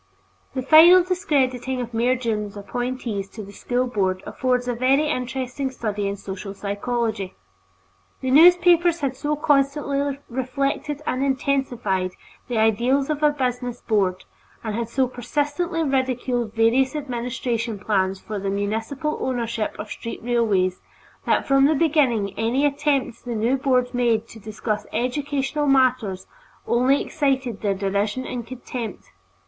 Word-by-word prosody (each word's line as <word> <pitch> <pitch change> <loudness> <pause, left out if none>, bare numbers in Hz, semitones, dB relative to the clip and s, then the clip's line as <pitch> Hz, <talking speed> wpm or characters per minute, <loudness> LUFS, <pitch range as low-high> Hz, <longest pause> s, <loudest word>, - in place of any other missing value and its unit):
The 260 - -2
final 335 +6 +8
discrediting 265 - 0
of 240 -1 -5
Mayor 240 +3 +2
Dunne's 215 -4 -3
appointees 240 -2 -4
to 215 - -8
the 200 - -11
School 245 +4 -1
Board 190 -6 -1
affords 250 -1 -1
a 245 - 0
very 265 +5 +2
interesting 260 -1 -2
study 210 -5 -3
in 200 0 -3
social 195 +1 -7
psychology; 205 0 -2 0.8
the 260 - -2
newspapers 345 +2 +6
had 270 -2 -1
so 295 +3 -1
constantly 280 -1 +1
reflected 275 +3 -2
and 255 +1 -1
intensified 245 -9 0 0.3
the 240 - -2
ideals 240 +6 +2
of 300 0 -3
a 300 - +5
business 250 -4 -2
Board, 190 -4 0 0.4
and 220 -2 -3
had 230 +1 -3
so 260 +1 +1
persistently 295 +7 -2
ridiculed 255 -4 -1
various 245 +5 +3
administration 240 -4 -3
plans 195 -2 0
for 210 0 -5
the 195 0 -2
municipal 225 +9 -2
ownership 235 -3 -2
of 210 - -7
street 230 - -6
railways, 210 -7 +1 0.5
that - - +2
from 275 0 +5
the 310 - +2
beginning 270 - +2
any 240 +6 +1
attempt 280 -3 0
the 240 -2 -4
new 230 +4 +1
Board 255 -2 +1
made 230 -2 +1
to 225 - -11
discuss 215 0 -4
educational 285 +3 -1
matters 255 -8 +2 0.4
only 255 +4 +3
excited 265 -7 -1
their 200 -2 0
derision 200 +6 -1
and 240 -2 -5
contempt. 240 -3 -7
250 Hz, 140 wpm, -23 LUFS, 220-275 Hz, 0.8 s, final